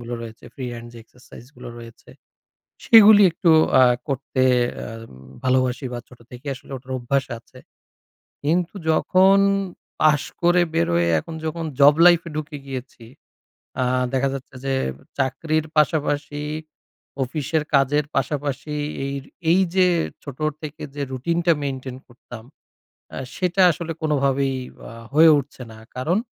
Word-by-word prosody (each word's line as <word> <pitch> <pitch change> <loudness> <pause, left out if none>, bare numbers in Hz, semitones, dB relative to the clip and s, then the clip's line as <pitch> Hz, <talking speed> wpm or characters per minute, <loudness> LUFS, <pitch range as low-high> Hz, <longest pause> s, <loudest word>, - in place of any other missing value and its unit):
গুলো 120 0 -6
রয়েছে, 115 -1 -11
free 130 - -6
hand 120 0 -8
যে 120 - -12
এক্সারসাইজ 120 0 -16
গুলো 125 - -9
রয়েছে। 115 -1 -13 0.7
সেগুলি 215 -2 +8
একটু 170 0 +2 0.3
আ - - +7 0.3
করতে 135 -1 -2 0.4
আ - - -7 0.6
ভালোবাসি 130 +1 +1
বা 120 - -4
ছোট 125 - -17
থেকে 125 +3 -12
আসলে 135 - -15
ওটার 130 +1 -9
অভ্যাস 135 +3 0
আছে। 130 +2 -18 0.8
কিন্তু 170 +5 0 0.2
যখন 190 +4 +4 0.6
পাশ 150 -2 +4 0.2
করে 175 +1 +4
বেরোয় 85 - +1
এখন 160 - -7
যখন 165 +1 -3 0.2
জব 145 +1 +8
লাইফ 175 -1 +6
এ - - -9
ঢুকে 150 -1 -5
গিয়েছি, 130 -3 -8 0.8
আ - - +2 0.3
দেখা 135 +1 +1
যাচ্ছে 135 -1 -8
যে 135 - 0 0.4
চাকরির 155 +4 -1
পাশাপাশি, 145 -1 0 0.8
অফিসের 150 +4 -2
কাজের 140 +2 +2
পাশাপাশি 145 +1 -2 0.3
এইর 140 -1 -4 0.3
এই 185 - +4 0.2
যে 185 -1 +5 0.4
ছোট 140 -2 -9 0.2
থেকে 155 0 -8
যে 145 - -4
রুটিন 135 +7 -2
টা 170 - +5
মেইনটেইন 130 -2 -5
করতাম 120 -2 -12 0.7
এ - - -7 0.2
সেটা 185 0 +1
আসলে 170 -1 -4
কোনভাবেই 140 -3 +1 0.3
আ - - -10 0.2
হয়ে 160 +2 +7
উঠছে 140 -2 -7
না। 110 - -13 0.2
কারণ 165 +10 0
140 Hz, 140 wpm, -22 LUFS, 130-160 Hz, 0.8 s, সেগুলি